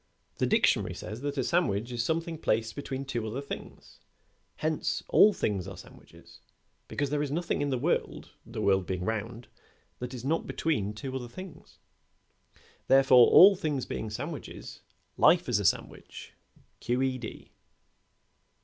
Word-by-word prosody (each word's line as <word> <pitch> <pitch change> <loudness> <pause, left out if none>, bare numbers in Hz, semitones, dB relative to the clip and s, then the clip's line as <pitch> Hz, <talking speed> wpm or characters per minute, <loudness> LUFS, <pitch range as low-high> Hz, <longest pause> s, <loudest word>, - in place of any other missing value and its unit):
The - - +2
dictionary - - +2
says 110 +3 -7
that 145 0 -3
a 130 - +1
sandwich 120 - 0
is 120 -1 -1
something 165 +2 -2
placed 110 -5 0
between 135 -1 -5
two 120 -4 -3
other 115 +5 -4
things; 140 - -9 0.6
hence, 155 -1 -2
all 210 - +7
things 100 - -2
are 95 -1 -8
sandwiches, 90 - -16 0.5
because 145 -1 -2
there 150 -1 0
is 145 - -2
nothing 160 +2 -2
in 145 - 0
the 130 - 0
world, - - -2
the - - -6
world 95 -2 +2
being 90 -1 -3
round, 110 +2 -4 0.5
that 125 +1 -6
is 125 0 -8
not 160 +4 0
between 105 -11 -1
two 130 +5 -6
other 125 -2 -4
things. 185 +9 -11 1.1
Therefore, 135 -2 +7
all 195 +2 +8
things 150 -7 -2
being 110 - -5
sandwiches, 140 +7 -7 0.4
life 175 -1 +5
is 120 -4 +1
a 100 - -3
sandwich, - - -2 0.5
Q. 125 +2 0
E. 130 -1 -1
D." 115 - -9
130 Hz, 155 wpm, -29 LUFS, 110-150 Hz, 1.1 s, all